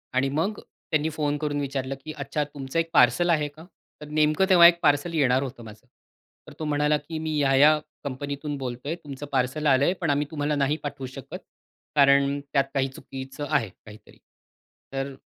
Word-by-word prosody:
आणि 135 +1 +2
मग 165 +9 -1
त्यांनी 155 0 -3
फोन 150 -2 -1
करून 145 -1 -2
विचारलं 135 -1 -3
की 155 - -5
"अच्छा 140 +1 -2
तुमचं 145 +1 -4
एक 165 0 -1
पार्सल 175 0 +4
आहे 155 -3 +2
का?" 155 +3 -15 0.4
तर 150 - -8
नेमकं 155 +4 +2
तेव्हा 175 -2 +9
एक 170 0 +3
पार्सल 145 +4 +2
येणार 135 -4 +2
होतं 130 -3 -7
माझं. 110 +2 -13 0.6
तर - - -11
तो 155 - -3
म्हणाला 150 0 +2
की 155 +2 -7
"मी 155 -1 -2
या-या 145 +2 +5 0.3
कंपनीतून 140 +1 -4
बोलतोय 130 +4 -4
तुमचं 140 0 -7
पार्सल 135 +3 0
आलंय 140 +5 +4
पण 165 - 0
आम्ही 145 +1 +1
तुम्हाला 150 -1 -1
नाही 145 +1 +1
पाठवू 140 -2 -5
शकत 130 0 -8 0.6
कारण 140 0 +4
त्यात 140 - +4
काही 135 -1 +1
चुकीचं 135 +2 -8
आहे 140 -9 +1
काहीतरी." 105 +3 -16 0.8
तर 135 0 -3
145 Hz, 175 wpm, -25 LUFS, 135-155 Hz, 0.8 s, तेव्हा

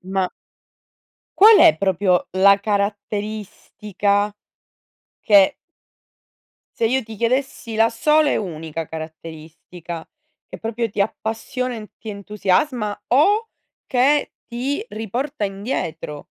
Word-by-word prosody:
Ma 190 0 -2 1.1
qual 430 +2 +9
è 155 - +7
proprio 185 -1 +1
la 195 +2 +5
caratteristica 205 0 -2 0.9
che 200 -3 +5 1.2
se 230 - +1
io 260 +3 +1
ti 220 -1 -10
chiedessi 235 0 -1
la 225 +1 +3
sola 300 +5 +3
e - - +1
unica 165 -4 -5
caratteristica 160 +1 -9 0.4
che - - -9
proprio 230 +1 -2
ti 200 -1 0
appassiona 225 +4 -3
e 225 - -6
n 210 - -11
ti 220 - -10
entusiasma 210 +3 -1
o 410 - +3 0.4
che 275 +3 +2
ti 260 +8 -3
riporta 235 +4 -4
indietro? 195 - -4
210 Hz, 105 wpm, -21 LUFS, 190-240 Hz, 1.2 s, qual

